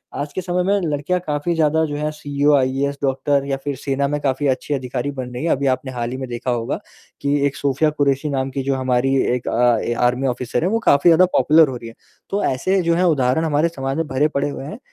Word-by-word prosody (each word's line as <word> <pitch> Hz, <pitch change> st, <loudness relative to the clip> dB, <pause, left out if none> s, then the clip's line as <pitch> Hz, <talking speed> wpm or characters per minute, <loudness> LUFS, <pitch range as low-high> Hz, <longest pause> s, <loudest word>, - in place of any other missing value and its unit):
आज 145 Hz, +1 st, -4 dB
के 185 Hz, -, -3 dB
समय 180 Hz, 0 st, -1 dB
में 200 Hz, +2 st, +2 dB
लड़कियाँ 145 Hz, +5 st, -1 dB
काफ़ी 150 Hz, +3 st, -1 dB
ज़्यादा 160 Hz, 0 st, +2 dB
जो 145 Hz, -1 st, -4 dB
हैं 150 Hz, +1 st, -2 dB
सीईओ, 145 Hz, -1 st, 0 dB
आईएएस, 135 Hz, +1 st, 0 dB
डॉक्टर 140 Hz, +1 st, +1 dB
या 135 Hz, -1 st, -2 dB
फिर 145 Hz, -1 st, -2 dB
सेना 140 Hz, +1 st, -1 dB
में 150 Hz, +1 st, -2 dB
काफ़ी 135 Hz, +1 st, 0 dB
अच्छे 135 Hz, +2 st, -1 dB
अधिकारी 130 Hz, 0 st, -3 dB
बन 130 Hz, -2 st, -6 dB
रही 125 Hz, -, -5 dB
हैं। 170 Hz, -, +1 dB
अभी 140 Hz, 0 st, +1 dB
आपने 130 Hz, 0 st, -1 dB
हाल 120 Hz, -1 st, -3 dB
ही 130 Hz, -, -4 dB
में 130 Hz, -1 st, -5 dB
देखा 120 Hz, +1 st, -3 dB
होगा 120 Hz, -1 st, -2 dB, 0.4 s
कि 140 Hz, 0 st, +1 dB
एक 140 Hz, -, -5 dB
सोफिया 140 Hz, +2 st, +1 dB
कुरैशी 145 Hz, 0 st, 0 dB
नाम 135 Hz, -1 st, -1 dB
की 135 Hz, +1 st, -3 dB
जो 135 Hz, 0 st, 0 dB
हमारी 130 Hz, +1 st, +1 dB, 0.2 s
एक 125 Hz, -, -6 dB
अ, 120 Hz, 0 st, +3 dB
ए 120 Hz, -, -1 dB
आर्मी 125 Hz, +2 st, +1 dB
ऑफिसर 125 Hz, +3 st, -2 dB
है 180 Hz, -, +1 dB
वो 225 Hz, +2 st, +1 dB
काफ़ी 155 Hz, -6 st, +4 dB
ज़्यादा 170 Hz, +3 st, +6 dB
पॉपुलर 155 Hz, +4 st, +5 dB
हो 130 Hz, -, -5 dB
रही 115 Hz, -, -10 dB
है। 115 Hz, -, -14 dB, 0.3 s
तो 200 Hz, +1 st, -1 dB
ऐसे 185 Hz, +9 st, +1 dB
जो 170 Hz, 0 st, +1 dB
हैं 180 Hz, -, +1 dB
उदाहरण 130 Hz, +5 st, +1 dB
हमारे 155 Hz, +1 st, +2 dB
समाज 135 Hz, -4 st, -4 dB
में 165 Hz, -1 st, -1 dB
भरे 140 Hz, +3 st, +1 dB
पड़े 145 Hz, -1 st, -1 dB
हुए 135 Hz, -1 st, -6 dB
हैं 205 Hz, -, -8 dB
140 Hz, 250 wpm, -20 LUFS, 130-150 Hz, 0.4 s, ज़्यादा